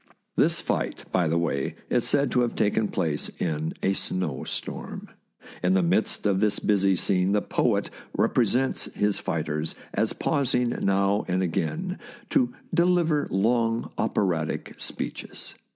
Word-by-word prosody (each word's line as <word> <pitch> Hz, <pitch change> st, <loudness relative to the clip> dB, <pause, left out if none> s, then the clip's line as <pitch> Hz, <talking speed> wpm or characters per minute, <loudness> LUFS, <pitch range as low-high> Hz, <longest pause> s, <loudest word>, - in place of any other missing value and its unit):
This -, -, +3 dB
fight, -, -, -2 dB
by 90 Hz, -3 st, +2 dB
the 80 Hz, +2 st, +1 dB
way, 80 Hz, -5 st, -1 dB, 0.2 s
is 120 Hz, -, +2 dB
said 140 Hz, -3 st, +2 dB
to -, -, +2 dB
have 120 Hz, -, 0 dB
taken 105 Hz, +1 st, +2 dB
place 80 Hz, -7 st, -1 dB
in 80 Hz, -2 st, -2 dB
a 95 Hz, -, +3 dB
snow 90 Hz, -8 st, -2 dB
storm. -, -, -5 dB, 0.5 s
In 90 Hz, +1 st, +3 dB
the 95 Hz, -, +3 dB
midst 85 Hz, -, +1 dB
of 100 Hz, -2 st, +3 dB
this 105 Hz, 0 st, +2 dB
busy 100 Hz, -2 st, +3 dB
scene 90 Hz, +1 st, +2 dB
the 105 Hz, -, +3 dB
poet -, -, +1 dB, 0.3 s
rep -, -, +2 dB
resents 125 Hz, +3 st, +2 dB
his 105 Hz, -1 st, +1 dB
fighters 80 Hz, -1 st, -1 dB, 0.2 s
as -, -, +1 dB
pausing 125 Hz, -3 st, +1 dB
now 100 Hz, -2 st, +1 dB
and 95 Hz, 0 st, +1 dB
again 165 Hz, -, -2 dB, 0.3 s
to 255 Hz, -4 st, +3 dB, 0.2 s
deliver 170 Hz, -4 st, +3 dB
long 115 Hz, +3 st, +1 dB
operatic 85 Hz, -6 st, 0 dB
speeches. -, -, -6 dB
100 Hz, 145 wpm, -26 LUFS, 90-120 Hz, 0.5 s, This